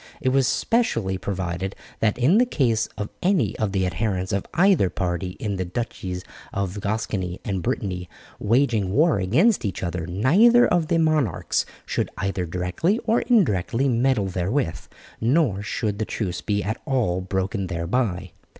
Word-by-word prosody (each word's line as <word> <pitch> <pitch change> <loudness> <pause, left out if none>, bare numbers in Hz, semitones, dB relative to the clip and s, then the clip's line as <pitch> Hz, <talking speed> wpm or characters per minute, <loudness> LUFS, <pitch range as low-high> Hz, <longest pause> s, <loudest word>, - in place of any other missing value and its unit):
It 130 - +1
was 135 0 +3
specially 115 - 0
provided 95 0 -3 0.2
that 110 -1 +1
in 145 - +4
the 250 - +5
case 115 - +1
of 105 -1 -3
any 175 - +2
of 110 -3 0
the 95 -1 +1
adherents 95 0 -1
of 100 - -1
either 180 - +4
party 90 0 -3
in 100 -3 -2
the 95 - -1
Duchies 90 -2 -4 0.3
of 100 +1 -3
Gascony 100 -4 -2
and 95 -3 -2
Brittany 95 -8 -3 0.3
waging 115 -4 +2
war 150 - +3
against 155 - +3
each 100 -4 -3
other, 85 -1 -3
neither 185 - +5
of 175 -3 +1
the 165 - +2
monarchs 155 - +1 0.2
should - - -1
either 95 -2 -2
directly 90 - 0
or 230 +1 +2
indirectly 135 - +2
meddle 125 -3 +2
therewith, 95 - -1 0.4
nor 120 - +2
should 105 0 -2
the 110 - 0
truce 95 -6 -3
be 105 -1 -1
at 110 +2 -3
all 110 -10 +1
broken 95 +1 -2
thereby. 95 +1 -1
105 Hz, 155 wpm, -24 LUFS, 95-135 Hz, 0.4 s, the